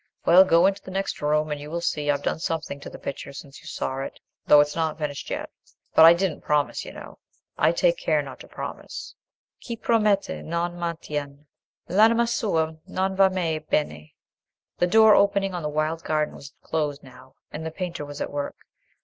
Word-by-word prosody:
Well, 180 +3 +8
go 170 -2 +4
on - - +7
into 200 0 -6
the - - -11
next 195 +1 -3
room, 150 +1 +1
and 145 -1 -3
you 145 - -8
will 170 +2 -2
see 150 -3 -1
I've 145 -1 +1
done - - -1
something 160 -4 -3
to - - -9
the - - -10
picture 140 - -6
since 140 0 -11
you 160 - -14
saw 135 -3 -3
it, 135 - -6 0.3
though 150 - +8
it's 145 0 +2
not 160 -2 -1
finished 150 -3 -4
yet. - - -4 0.4
But 160 - +8
I 165 - +10
didn't 180 -3 -1
promise, 150 -1 0
you - - -8
know: - - -11 0.4
I - - +3
take - - +2
care - - +1
not - - -10
to - - -12
promise:— - - -7 0.5
"'Chi 235 - -4
promette 215 -3 +2
e - - -10
non 170 +1 -2
mantiene 150 -4 -5 0.4
L'anima 225 +5 +4
sua 165 -9 0
non 190 +1 -1
va 195 0 +5
mai 170 -4 -1
bene.'" 80 - -2 0.6
The 175 - +3
door 220 +3 +7
opening 200 -1 +3
on 175 - -3
the 150 - -2
wild 155 +2 -1
garden 155 -1 0
was 140 - -11
closed 150 -2 -2
now, 130 0 -16 0.2
and 155 - -6
the 160 - -3
painter 170 -2 -5
was 145 0 -8
at - - -3
work. 145 0 -3
160 Hz, 205 wpm, -25 LUFS, 150-190 Hz, 0.6 s, I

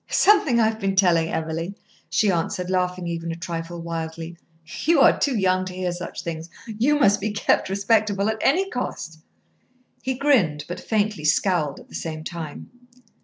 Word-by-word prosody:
"Something 385 - +4
I 225 - +5
have 220 0 -2
been 195 -2 -1
telling 170 -4 +3
Emily," 165 +4 -3 0.3
she 210 -2 +2
answered, 180 +1 -2
laughing 180 -1 0
even 170 0 -3
a - - -4
trifle 170 0 -5
wildly. 165 0 -5 0.5
"You 325 -1 +4
are - - +6
too 275 -5 +1
young 185 -2 +2
to 185 -1 -7
hear 185 -1 -2
such 175 0 -6
things. 165 0 -5 0.2
You 240 +7 +1
must 205 -6 +4
be 215 - -1
kept 205 -2 +1
respectable 200 0 +1
at 220 0 -1
any 370 +8 +3
cost." 165 -10 -5 0.8
He 260 -1 -2
grinned, 210 - +2
but 175 - -5
faintly 210 -6 -1
scowled 150 -2 +1
at - - -15
the - - -18
same 155 -1 -5
time. 160 -3 -7
185 Hz, 170 wpm, -23 LUFS, 165-220 Hz, 0.8 s, are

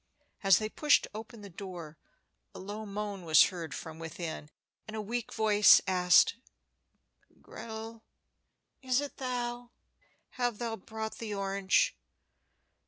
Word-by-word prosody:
As 195 -3 +6
they 215 - -2
pushed 295 +6 +3
open 220 +1 -9
the 200 - -10
door, 170 -4 -8 0.6
a - - -8
low 210 +3 -6
moan 205 -1 -5
was 160 -2 +7
heard 170 -6 -6
from 160 0 -8
within, 160 -2 -6 0.4
and 215 - -7
a - - -3
weak 230 +3 -4
voice 210 -1 +6
asked, 180 +3 +4 1.0
"Gretel, 225 0 -8 0.8
is 255 -1 +1
it 290 -1 -5
thou? 245 -2 -4 0.6
Hast 245 -3 -1
thou 230 -1 -3
brought 220 +2 -7
the 215 -3 -4
orange?" 195 - +1
210 Hz, 125 wpm, -31 LUFS, 190-230 Hz, 1.0 s, was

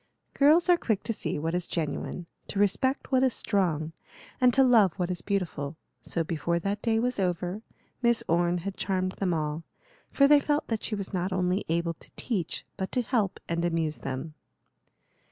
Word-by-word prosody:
Girls 310 +5 +5
are 355 -1 +6
quick 215 -4 0
to 230 - -1
see - - -3
what 160 +3 -2
is 180 -1 -1
genuine, 165 +2 -3 0.2
to - - -5
respect 205 +9 +1
what 260 -1 +4
is 260 -2 +2
strong, 170 -7 0 0.5
and 250 -1 +6
to 270 +2 +5
love 225 -9 +5
what 180 -2 -2
is 175 -2 -3
beautiful; 165 -7 -2 0.2
so 165 - -2
before 170 +1 -1
that 200 +4 -2
day 225 -2 +1
was 250 0 0
over, 180 +2 -1 0.4
Miss 235 -2 +3
Orne 175 +1 +2
had 200 -1 -3
charmed 185 -1 0
them 190 -3 +1
all; 155 -1 -1 0.5
for 275 - +4
they 295 0 +7
felt 295 +1 0
that 225 -2 -1
she 215 - -2
was 200 -1 -5
not 185 +1 -1
only 185 +1 0
able 170 0 0
to - - -18
teach 195 -10 -3
but 190 -1 -3
to 250 - +2
help 220 -6 0
and 170 0 -1
amuse 165 -3 0
them. 135 +4 -5
185 Hz, 190 wpm, -28 LUFS, 170-230 Hz, 0.5 s, they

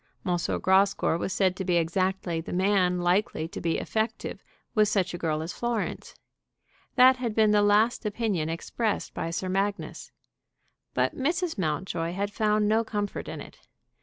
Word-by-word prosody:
M. 180 -2 +1 0.3
Grascour 190 -3 +3
was 190 - -2
said 185 -1 +2
to 190 - -4
be 180 -1 +1
exactly 175 0 0
the - - -8
man 185 -1 +2
likely 175 -2 +1
to - - -7
be 165 -1 0
effective 220 +1 -3 0.3
with 215 -2 +4
such 190 -3 0
a - - -3
girl 155 -2 -1
as 165 - -5
Florence. 235 -3 -3 0.8
That 255 +1 +7
had 235 -4 -3
been 215 -1 +4
the 210 0 +4
last 210 +3 +3
opinion 205 -7 -1
expressed 210 +6 -2
by 165 - -3
Sir 170 +3 -3
Magnus. 195 +2 -2 0.8
But - - +1
Mrs. 325 - -1
Mountjoy 165 +1 -2
had 200 +2 -2
found 210 0 +2
no 220 +2 +3
comfort 205 -2 -3
in - - -6
it. - - -12
195 Hz, 165 wpm, -27 LUFS, 175-215 Hz, 0.8 s, That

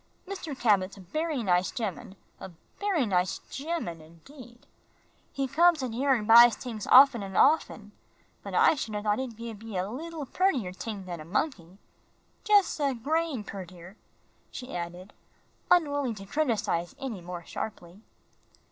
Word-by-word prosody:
"Mr. 345 -8 -6
Cabot's 200 -4 +2
a - - -12
bery 305 - -3
nice 180 -2 +2
gemman 195 - -5 0.2
a - - -8 0.3
bery 390 -10 +1
nice 180 -3 0
gemman 275 - -4
indeed. 235 - -16 0.7
He 275 -1 -2
comes 320 +2 +3
in 250 - -3
here 270 +4 -1
an' 215 -4 -3
buys 235 +1 +8
tings 225 -5 -7
offen 260 -3 +7
an' 195 -1 -7
offen. 220 -8 +2 0.5
But - - -7
I - - +5
should 225 -8 -5
a 205 - -3
thought 210 +1 +1
he'd 250 -4 -5
gib 230 -2 -8
ye 225 -4 -6
a 180 +1 -1
leetle 310 +6 -6
purtier 270 - 0
ting 200 +1 -6
dan 175 -2 -7
a - - -8
monkey. 190 - -3 0.7
Jus' 410 -6 +3
a 280 -3 0
grain 300 0 -1
purtier," 185 -2 -10 0.5
she 250 -7 -8
added, 175 +3 -6 0.6
unwilling 285 -8 +2
to 195 -1 -10
criticise 210 - -1
any 235 -9 -6
more 175 -1 -8
sharply. 185 -2 -7
225 Hz, 155 wpm, -28 LUFS, 190-285 Hz, 0.7 s, buys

